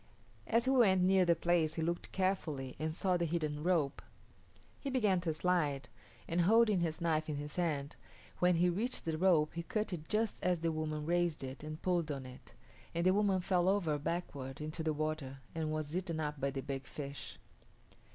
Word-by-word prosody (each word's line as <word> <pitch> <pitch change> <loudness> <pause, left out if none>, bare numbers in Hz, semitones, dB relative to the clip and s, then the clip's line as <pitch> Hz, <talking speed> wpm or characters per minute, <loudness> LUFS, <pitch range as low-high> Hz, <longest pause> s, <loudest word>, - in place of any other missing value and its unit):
As 230 +2 +3
he 260 - +3
went 200 -8 +5
near 190 0 +5
the 170 -1 +4
place 165 -2 +1
he 160 - -1
looked 170 +1 -2
carefully 160 -9 -1
and 155 +1 -1
saw 180 +3 +1
the 170 - 0
hidden 155 -3 -2
rope. 160 -5 +1 0.8
He 280 - -4
began 210 -9 +2
to 170 -2 0
slide, 155 -5 0 0.4
and 170 +1 +1
holding 215 +1 +5
his 165 -2 -2
knife 155 -2 +1
in 150 - -1
his 145 0 -6
hand, 150 -5 -1 0.4
when 180 0 +4
he 175 +2 +3
reached 215 +9 -1
the 160 -1 -1
rope 165 -5 +4
he 170 - -3
cut 215 +2 -2
it 160 -2 -6
just 220 0 0
as 180 -2 +1
the 165 0 +1
woman 155 -1 -3
raised 175 -3 +1
it 130 +2 -6
and 155 0 -6
pulled 175 -4 +1
on 135 -2 -4
it, 130 0 -12 0.4
and 170 +1 0
the 185 - +5
woman 200 -2 +2
fell 180 0 +2
over 170 -7 +1
backward 140 -5 -4
into 155 +2 -4
the 160 -1 +1
water 155 -3 -3 0.2
and 160 -1 -2
was 155 0 -3
eaten 175 -3 -2
up 150 -2 -3
by 140 - +1
the 135 0 -4
big 135 -1 -5
fish. 140 -1 -7
165 Hz, 200 wpm, -34 LUFS, 150-180 Hz, 0.8 s, went